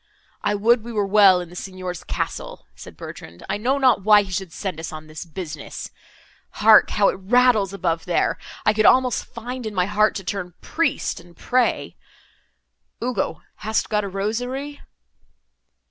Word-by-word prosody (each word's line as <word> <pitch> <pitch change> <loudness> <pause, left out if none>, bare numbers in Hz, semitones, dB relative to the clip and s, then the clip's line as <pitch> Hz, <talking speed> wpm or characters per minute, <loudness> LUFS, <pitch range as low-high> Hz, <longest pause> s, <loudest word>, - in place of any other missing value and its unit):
"I 205 0 0
would 225 +3 +3
we 235 - -7
were 210 -3 0
well 195 -2 +6
in 175 - -8
the 175 - -13
Signor's 185 -2 -6
castle!" - - -5
said - - -12
Bertrand, 85 +2 -10
"I - - -1
know 255 +6 +1
not 255 -7 +3
why 210 0 +6
he 190 - -10
should 185 -1 -3
send 185 -2 -5
us 160 - -5
on 155 0 -8
this 155 +2 -8
business. 160 -3 -7 0.6
Hark! 215 0 +6
how 200 -1 +3
it - - -4
rattles 220 -1 +3
above, 170 -4 -2
there! 175 - 0 0.3
I 215 - +4
could 215 0 +3
almost 255 -1 +3
find 245 +2 -7
in 215 -2 -5
my 180 -1 +2
heart 210 +2 +2
to 195 - -4
turn 180 -3 -4
priest, 330 0 -1
and 175 -1 -17
pray. 250 -1 0 1.1
Ugo, 240 -10 -2
hast 220 +2 -1
got 210 -1 +1
a - - -3
rosary?" 245 +9 -3
205 Hz, 170 wpm, -22 LUFS, 180-235 Hz, 1.1 s, well